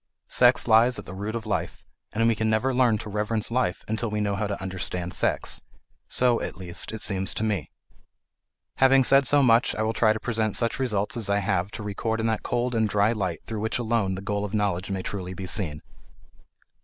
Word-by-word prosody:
Sex 125 0 +4
lies 120 +2 +5
at - - -7
the - - -8
root 105 +4 -4
of 115 -1 -4
life, 105 - -3 0.3
and 115 +2 +1
we 115 - +4
can 110 0 -1
never 110 +5 +1
learn 125 -3 +3
to 105 - -8
reverence 105 +2 -1
life 115 -7 0
until 110 +1 -1
we 105 0 -2
know 100 -1 0
how 105 +1 -1
to 100 - -4
understand 90 -1 -4
sex. - - 0 0.5
So, 125 -2 +2
at - - -5
least, 90 -2 -3
it 110 -1 -6
seems 95 -2 +1
to - - -2
me. 105 -3 -1 1.1
Having 135 0 +5
said 135 +1 +5
so 145 -1 +4
much, 120 +1 +4
I 110 - -1
will 110 +1 0
try 110 -1 +3
to 110 - -1
present 110 -3 -1
such 115 +1 -1
results 115 -1 -1
as 110 -4 -1
I 100 - +2
have 100 -2 0
to - - -6
record 110 +2 -2
in 110 - -1
that 110 -1 0
cold 120 +1 -1
and 110 -2 +1
dry 105 +2 +2
light 95 -7 -3
through 110 -2 -5
which 110 +1 -1
alone 110 -5 0
the 95 - -6
goal 100 0 -2
of 105 +1 -3
knowledge 100 -3 -1
may 95 -1 -3
truly 95 -2 -5
be 95 +1 -6
seen. 85 -5 -1
110 Hz, 220 wpm, -25 LUFS, 100-115 Hz, 1.1 s, lies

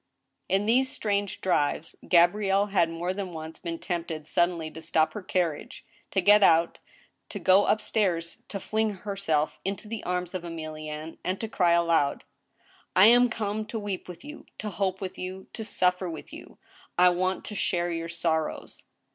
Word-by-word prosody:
In 195 +2 +2
these 255 +4 +3
strange 205 -2 -2
drives, 160 -3 0
Gabrielle 195 +3 +4
had 170 -4 +4
more 170 +2 -2
than 190 -2 -5
once 160 0 -8
been 165 -1 -4
tempted 165 -3 -4
suddenly 170 -1 0
to 160 - -9
stop 160 0 +1
her 210 - -5
carriage, 175 -5 -2 0.2
to 190 - +1
get 205 +3 +6
out, 170 -3 +4 0.5
to - - -6
go 190 +2 +5
up 215 - +2
stairs, 170 -6 -1
to 200 - -5
fling 220 +2 0 0.2
herself 160 -7 -1
into 195 +2 -4
the 225 0 -5
arms 180 0 -2
of 185 - -3
Emilienne, 155 -2 -7
and 185 +1 -2
to 225 - -3
cry 180 -5 +2
aloud: 165 -4 +2 0.4
*' - - -35 0.3
I 185 +2 +8
am 245 +1 +6
come 215 -2 -2
to 225 - -4
weep 205 -3 -4
with 175 -1 -10
you, 300 +1 -10
to 210 - -5
hope 190 0 -1
with 190 0 -6
you, 185 +1 -6
to 225 - -5
suffer 180 -3 +1
with 160 - -8
you! - - -11 0.4
I 180 +1 +7
want 185 +1 -1
to - - -5
share 175 -2 0
your 165 0 -3
sorrows." 160 -2 -2
180 Hz, 180 wpm, -27 LUFS, 165-200 Hz, 0.5 s, I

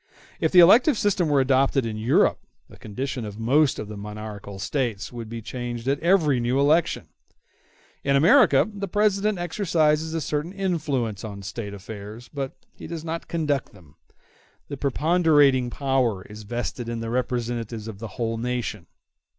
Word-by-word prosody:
If - - +1
the 180 - +8
elective 230 - +6
system 190 -6 +1
were 140 -2 +4
adopted 135 0 +2
in 110 -1 -3
Europe, 110 +4 +2 0.3
the - - -15
condition 125 +3 -4
of 105 -1 -7
most 135 +6 +2
of 105 - -5
the 105 - -7
monarchical 105 -1 -8
States 115 0 -2
would 115 -2 -7
be 115 -1 -6
changed 120 0 -5
at 140 +1 +1
every 165 -7 +3
new 120 +3 0
election. 150 +4 +2 0.9
In 140 0 +2
America 170 - +5
the 205 -2 -5
President 210 +1 +1
exercises 160 -3 +1
a - - 0
certain 150 +4 -3
influence 150 - -2
on 100 -2 -7
State 100 +1 -6
affairs, 105 +3 -9
but 135 -2 -4 0.2
he - - -10
does 165 -1 -6
not 165 +1 -4
conduct 150 -7 -1
them; 85 -8 -18 0.7
the 145 - -4
preponderating 145 -3 +3
power 130 -7 0
is 105 +2 -11
vested 120 +2 -4
in 115 -1 -3
the 115 0 -4
representatives 120 -3 -2
of 105 -3 -8
the 115 - -5
whole 115 -1 -2
nation. 125 -1 -3
130 Hz, 160 wpm, -24 LUFS, 115-160 Hz, 0.9 s, the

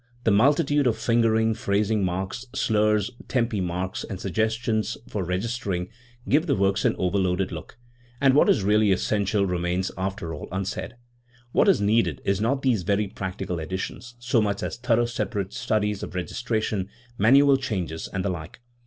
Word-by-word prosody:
The 110 - +3
multitude 145 +5 +3
of 115 - +1
fingering, 115 -1 +2
phrasing 105 -1 0
marks, 95 +7 -3
slurs, 105 -2 +2 0.2
tempi 115 -5 0
marks, 90 +1 -3
and 95 -4 -6
suggestions 110 +3 -1
for 100 - -3
registering 95 0 -2 0.4
give 155 +5 +3
the 140 - +2
works 100 -1 +1
an - - +3
overloaded 95 0 0
look, 85 +5 -8 0.4
and 135 -1 +4
what 145 - +5
is 100 - +3
really 105 +1 +3
essential 100 +1 +1
remains 90 0 -1
after 95 -3 -3
all 75 - -7
unsaid. 95 +5 -4 0.6
What - - +3
is 190 - +4
needed 110 +3 +2
is 100 0 +1
not 135 +5 0
these 125 -7 +2
very 100 +4 +1
practical 95 -3 -4
editions 95 +8 -5
so 120 -1 +1
much 100 -1 -1
as - - -3
thorough 120 -1 +2
separate 105 -4 -3
studies 105 -4 -1
of - - -7
registration, 110 0 -2 0.3
manual 135 +6 +6
changes, 95 -11 -4
and 95 -1 -2
the - - +1
like. 85 +3 -6
105 Hz, 160 wpm, -25 LUFS, 95-115 Hz, 0.6 s, manual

